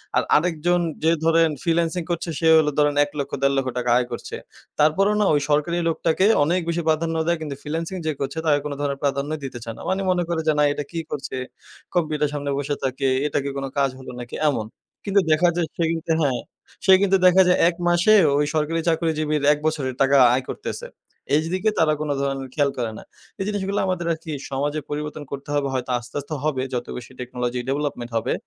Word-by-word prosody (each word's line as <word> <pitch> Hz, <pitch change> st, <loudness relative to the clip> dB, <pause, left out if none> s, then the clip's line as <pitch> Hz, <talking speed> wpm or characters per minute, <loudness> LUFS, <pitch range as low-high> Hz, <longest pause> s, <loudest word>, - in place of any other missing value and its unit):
আর -, -, +3 dB
আরেকজন 175 Hz, +2 st, +2 dB, 0.2 s
যে 160 Hz, -, +4 dB
ধরেন, 165 Hz, 0 st, +4 dB
ফ্রিল্যান্সিং 170 Hz, +1 st, +1 dB
করছে 170 Hz, 0 st, -2 dB
সে 165 Hz, -, +2 dB
হলো 150 Hz, -1 st, +2 dB
ধরেন 145 Hz, -1 st, +3 dB
৳১,০০,০০০-৳১,৫০,০০০ 140 Hz, -3 st, -1 dB
আয় 125 Hz, -, +1 dB
করছে। -, -, -6 dB, 0.4 s
তারপরেও 190 Hz, +8 st, +3 dB
না -, -, +3 dB
ওই 145 Hz, -, +3 dB
সরকারি 150 Hz, +4 st, +1 dB
লোকটাকে 165 Hz, +3 st, +1 dB, 0.2 s
অনেক 175 Hz, +5 st, +1 dB
বেশি 170 Hz, +1 st, 0 dB
প্রাধান্য 165 Hz, +1 st, +1 dB
দেয়, 170 Hz, -1 st, +2 dB
কিন্তু 150 Hz, -3 st, -4 dB
ফ্রিল্যান্সিং 165 Hz, +4 st, -4 dB
যে 155 Hz, -, +1 dB
করছে 140 Hz, +3 st, -3 dB
তাকে 145 Hz, -2 st, +3 dB
কোন 145 Hz, -, -3 dB
ধরণের 140 Hz, -1 st, -2 dB
প্রাধান্যই 140 Hz, +2 st, -1 dB
দিতে 125 Hz, -2 st, -6 dB
চায় 115 Hz, -1 st, -6 dB
না। -, -, -10 dB
মানি 190 Hz, +1 st, 0 dB
মনে 180 Hz, -1 st, +1 dB
করে 170 Hz, -1 st, 0 dB
যে, 155 Hz, -, +4 dB
না -, -, +5 dB
এটা 145 Hz, -, -4 dB
কী 170 Hz, -, -3 dB
করছে 140 Hz, -2 st, -4 dB, 0.6 s
কম্পিউটারের 155 Hz, -3 st, +1 dB
সামনে 145 Hz, -1 st, -2 dB
বসে 145 Hz, +1 st, -2 dB
থাকে 135 Hz, +1 st, -1 dB, 0.2 s
এটা 145 Hz, -, -2 dB
কি 140 Hz, -, -2 dB
কোনো 135 Hz, 0 st, -3 dB
কাজ 140 Hz, -1 st, +3 dB
হলো 130 Hz, -, -9 dB
নাকি 120 Hz, -, -7 dB
এমন। 115 Hz, -6 st, -2 dB, 0.4 s
কিন্তু 200 Hz, -1 st, +3 dB
দেখা 165 Hz, +3 st, +4 dB
যায় 175 Hz, -2 st, 0 dB
সেই 165 Hz, -1 st, +1 dB
কিন্তু 165 Hz, 0 st, -3 dB
হ্যাঁ, 135 Hz, -5 st, +1 dB, 0.5 s
সেই 190 Hz, -1 st, +8 dB
কিন্তু 195 Hz, -1 st, +4 dB
দেখা 185 Hz, +1 st, +7 dB
যায় 180 Hz, -, +4 dB
এক 175 Hz, -, -5 dB
মাসে 175 Hz, +5 st, +4 dB, 0.2 s
ওই, 150 Hz, -, +2 dB
সরকারি 160 Hz, +1 st, 0 dB
চাকরিজীবীর 155 Hz, -2 st, 0 dB
এক 150 Hz, -, -5 dB
বছরের 140 Hz, -5 st, -2 dB
টাকা 135 Hz, +1 st, +5 dB, 0.2 s
আয় 130 Hz, +1 st, +1 dB
করতেছে। -, -, -5 dB, 0.5 s
এইদিকে 180 Hz, +7 st, +1 dB
তারা 155 Hz, -2 st, +4 dB
কোনো 150 Hz, -1 st, -1 dB
ধরণের 135 Hz, -1 st, -2 dB
খেয়াল 145 Hz, -1 st, +2 dB
করে 120 Hz, -3 st, -2 dB
না। -, -, -10 dB, 0.4 s
এই 195 Hz, -, -1 dB
জিনিসগুলা 200 Hz, -1 st, -1 dB
আমাদের 180 Hz, -2 st, -1 dB
আর -, -, -5 dB
কি 160 Hz, -, -6 dB, 0.2 s
সমাজে 145 Hz, +3 st, -1 dB
পরিবর্তন 150 Hz, 0 st, -4 dB
করতে 140 Hz, 0 st, -7 dB
হবে, 145 Hz, -1 st, +1 dB
হয়তো 130 Hz, -1 st, -2 dB
আস্তে, 120 Hz, +1 st, -14 dB
আস্তে 145 Hz, +2 st, -7 dB
হবে 150 Hz, -4 st, 0 dB
যত 125 Hz, -, -2 dB
বেশি 125 Hz, 0 st, -9 dB
টেকনোলজি 125 Hz, 0 st, -3 dB
ডেভেলপমেন্ট 135 Hz, -4 st, -2 dB
হবে। 115 Hz, -, -1 dB
150 Hz, 200 wpm, -23 LUFS, 140-165 Hz, 0.6 s, সেই